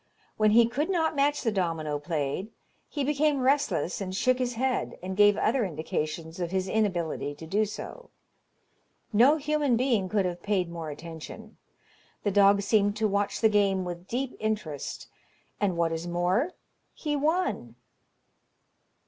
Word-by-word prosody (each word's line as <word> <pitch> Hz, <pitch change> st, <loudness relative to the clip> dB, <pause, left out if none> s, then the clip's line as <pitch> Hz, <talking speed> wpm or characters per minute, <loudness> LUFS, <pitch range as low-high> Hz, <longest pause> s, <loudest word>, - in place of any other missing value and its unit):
When 215 Hz, 0 st, +3 dB
he 230 Hz, +2 st, +6 dB
could 275 Hz, +8 st, -2 dB
not 325 Hz, -4 st, +1 dB
match 290 Hz, +1 st, +1 dB
the 225 Hz, -, +1 dB
domino 165 Hz, -6 st, -1 dB
played, 150 Hz, +5 st, -2 dB, 0.4 s
he 290 Hz, -, -2 dB
became 290 Hz, 0 st, +1 dB
restless 255 Hz, -, +1 dB
and 185 Hz, -1 st, -4 dB
shook 255 Hz, +6 st, +2 dB
his 245 Hz, -1 st, -1 dB
head, 255 Hz, +2 st, -1 dB
and 190 Hz, +1 st, -4 dB
gave 205 Hz, 0 st, +5 dB
other 235 Hz, +3 st, +2 dB
indications 160 Hz, -1 st, -4 dB
of 175 Hz, -2 st, -2 dB
his 190 Hz, +1 st, -1 dB
inability 175 Hz, -9 st, -1 dB
to 160 Hz, -, -10 dB
do 205 Hz, +6 st, +1 dB
so. 350 Hz, -, -8 dB, 1.0 s
No 255 Hz, +9 st, +6 dB
human 295 Hz, -4 st, +1 dB
being 235 Hz, -7 st, +1 dB
could 205 Hz, -2 st, +1 dB
have 175 Hz, -1 st, -3 dB
paid 185 Hz, -4 st, 0 dB
more 165 Hz, -2 st, -5 dB
attention. 165 Hz, +8 st, -9 dB, 0.7 s
The 205 Hz, -, +1 dB
dog 200 Hz, 0 st, +5 dB
seemed 205 Hz, 0 st, +2 dB
to 220 Hz, -, +2 dB
watch 200 Hz, 0 st, -1 dB
the 225 Hz, -, +6 dB
game 200 Hz, -3 st, +2 dB
with 175 Hz, +1 st, -6 dB
deep 255 Hz, +4 st, -3 dB
interest, 210 Hz, -10 st, -3 dB, 0.5 s
and 195 Hz, -4 st, 0 dB
what 170 Hz, -1 st, +1 dB
is 165 Hz, +1 st, -3 dB
more, 180 Hz, -, 0 dB, 0.4 s
he 300 Hz, -2 st, -2 dB
won. 300 Hz, -, 0 dB
205 Hz, 155 wpm, -28 LUFS, 175-250 Hz, 1.0 s, he